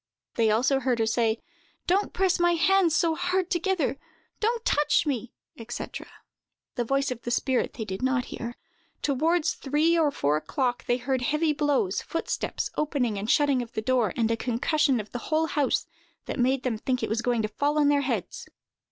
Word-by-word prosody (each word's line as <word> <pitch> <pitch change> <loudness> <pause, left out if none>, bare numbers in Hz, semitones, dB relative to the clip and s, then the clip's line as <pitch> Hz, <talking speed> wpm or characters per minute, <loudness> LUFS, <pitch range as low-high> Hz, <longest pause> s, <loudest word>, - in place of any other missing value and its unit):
They 225 -2 +2
also 245 +5 +2
heard 255 -2 0
her 225 - +1
say, 225 0 +1 0.5
"Don't 390 +3 +1
press 375 -1 +1
my 345 0 +4
hands 345 -1 +3
so 335 -2 +2
hard 360 +2 -1
together!"—"Don't 380 - -2
touch 295 +2 +2
me!" 250 -5 -2 0.4
&c. - - -3 0.9
The 240 - -1
voice 275 +3 0
of 240 -2 -5
the - - -5
spirit 250 +1 0
they 220 - -5
did 190 -1 -5
not 255 -1 +1
hear. 235 0 -5 0.5
Toward 310 +4 +1
three 300 +4 +1
or 310 -2 +4
four 150 - 0
o'clock, 245 - -2
they 245 - +2
heard 255 +1 -1
heavy 300 +4 +1
blows, 280 -10 +1
footsteps, 330 - -3
opening 255 -8 0
and 210 +3 -4
shutting 285 -3 +3
of 235 -1 -8
the 220 - -2
door, 245 -5 +2
and 230 -1 +1
a - - +2
concussion 260 +4 +1
of 210 - -7
the 245 - -4
whole 315 +1 +2
house, 290 -4 0 0.4
that - - -5
made 260 +1 +2
them 235 -4 -1
think 255 +2 -1
it - - -1
was 225 +2 0
going 235 -2 0
to - - +1
fall 285 +8 -1
on 290 -1 +4
their 290 -1 +3
heads. 240 -9 -3
265 Hz, 185 wpm, -26 LUFS, 235-310 Hz, 0.9 s, my